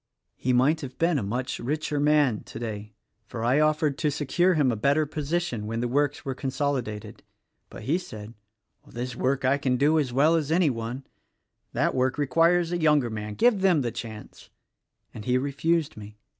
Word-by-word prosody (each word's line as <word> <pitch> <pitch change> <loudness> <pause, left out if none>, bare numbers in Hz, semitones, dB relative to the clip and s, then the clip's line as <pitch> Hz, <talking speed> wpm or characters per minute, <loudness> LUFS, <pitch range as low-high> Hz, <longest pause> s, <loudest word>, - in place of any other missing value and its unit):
"He 130 - -1
might 135 +6 +3
have 135 -3 -8
been 165 -3 +2
a - - -3
much 120 +6 -3
richer 150 +2 -2
man 145 -6 +3
today, 110 -2 -6 0.4
for 115 - -6
I 125 +5 +3
offered 155 -2 +1
to 150 - +1
secure 155 +6 +1
him 140 -5 +3
a - - -1
better 140 +8 +2
position 150 -6 -3
when 115 +1 -3
the 120 - -1
works 145 +3 0
were 135 - -2
consolidated; 130 -6 -3 0.5
but - - -10
he 160 +7 +1
said, 110 - -9 0.5
'This 120 +1 -5
work 135 +2 0
I 140 +2 +3
can 130 -2 +1
do 150 +4 +3
as 135 -5 -1
well 145 +6 +4
as 155 -2 0
any 165 -3 +3
one 120 +3 -5 0.3
— - - -51
that - - +1
work 130 +1 0
requires 165 +5 +2
a 175 -1 -1
younger 150 -6 +3
man: 105 -1 -5
give 230 - +3
them 180 -6 +4
the 120 -2 -2
chance,' 110 -2 -9 0.3
— - - -50
and 105 - -9
he 125 0 +2
refused 145 +4 0
me. 105 0 -11
135 Hz, 190 wpm, -26 LUFS, 120-155 Hz, 0.5 s, well